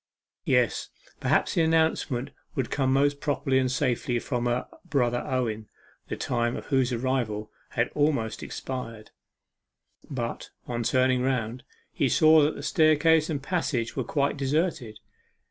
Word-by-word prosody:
Yes, - - +1 0.3
perhaps - - +1
the 175 - +2
announcement 160 -5 +1 0.2
would 130 -3 -2
come 135 -2 +1
most 140 +1 +2
properly 140 -2 +1
and 130 -1 0
safely 125 -2 0
for - - -4
her - - -14
from 120 - -2
her 120 +1 -1 0.2
brother 125 -7 0
Owen, 110 -4 -2 0.4
the - - -4
time 120 -1 -1
of - - -8
whose 130 -2 +1
arrival 120 -4 -1 0.3
had 120 +1 +2
almost 140 -7 0
expired. 115 -5 -6 1.0
But, 120 -4 -4 0.2
on 120 -1 -3
turning 130 +1 +2
round, 125 -2 -1 0.3
he 135 - +1
saw 155 +4 +6
that 150 +1 +2
the - - -8
staircase 155 +2 +4
and 145 -4 -3
passage 140 -9 -1
were 130 - -1
quite 140 +4 0
deserted. 140 -5 -1
130 Hz, 145 wpm, -27 LUFS, 120-145 Hz, 1.0 s, saw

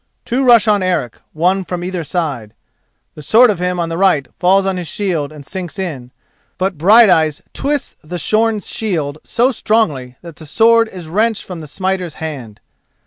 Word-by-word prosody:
Two 255 +3 0
rush 235 -4 +5
on 205 -2 +3
Eric, 175 -11 -2
one 185 +4 +1
from 180 -1 -5
either 180 -1 -3
side. 145 - -4 0.6
The 150 - -11
sword 225 - +5
of 195 - -4
him 180 0 -1
on 170 -1 -1
the 165 +1 -4
right 180 -9 +2
falls 190 +2 +3
on 190 -1 -1
his 175 -2 -5
shield 165 -8 -2
and 150 -2 -12
sinks 185 +2 -6
in, 150 -10 -5 0.5
but 185 0 -1
Brighteyes 175 -4 +4
twists 285 0 -2
the 175 +4 -6
shorn 215 +5 +1
shield 160 -10 -3
so 245 +3 +1
strongly 155 - -1
that 170 -3 -11
the 155 - -12
sword 230 +6 +4
is 180 -5 -9
wrenched 215 +6 0
from 180 -3 -8
the 155 - -9
smiter's 185 0 -3
hand. 135 -10 -7
180 Hz, 180 wpm, -16 LUFS, 155-210 Hz, 0.6 s, rush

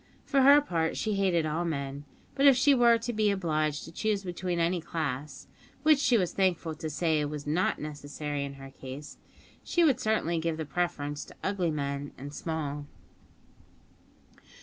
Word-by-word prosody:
For 275 -2 +3
her 285 +2 +8
part, 165 - -1
she 215 - -1
hated 185 -5 +2
all 155 +3 -1
men, 140 -3 -4 0.3
but 275 +1 +4
if 275 - +8
she 275 +3 +5
were 240 -2 +5
to 230 +1 -4
be 215 -1 +2
obliged 155 -6 0
to 165 - -10
choose 205 +3 -1
between 180 -1 -3
any 170 +1 +1
class 150 -3 -4 0.4
(which 305 -2 +5
she 250 -4 +4
was 180 -5 0
thankful 180 -4 +1
to 155 0 -5
say 155 0 +1
was 145 0 -4
not 160 +5 +1
necessary 145 -1 -5
in 140 0 -6
her 135 0 -11
case), 135 +2 -9 0.4
she 345 - +2
would 275 -6 +4
certainly 195 -8 0
give 160 -1 -1
the 160 - -3
preference 145 -2 -2
to - - -14
ugly 190 -3 0
men 140 -1 -3
and 140 +2 -8
small. 150 -3 -4
165 Hz, 170 wpm, -29 LUFS, 145-200 Hz, 0.4 s, her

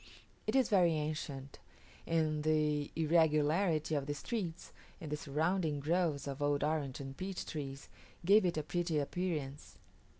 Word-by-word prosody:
It - - 0
is 265 -1 +4
very 180 -6 +5
ancient; 150 -3 -4 0.5
and 155 -2 +1
the 150 -1 +1
irregularity 160 +1 +3
of 140 -2 0
the 145 - -2
streets, 175 -2 -4 0.3
and 155 -3 -7
the - - +1
surrounding 155 +2 0
groves 155 -2 0
of 140 +1 -5
old 145 0 +1
orange 150 -3 -1
and 135 -1 -6
peach 190 +2 -4
trees, 140 -3 -6 0.4
gave 205 +4 +6
it 175 -3 0
a 155 - 0
pretty 170 0 -1
appearance. 150 -2 -3
155 Hz, 145 wpm, -34 LUFS, 145-170 Hz, 0.5 s, gave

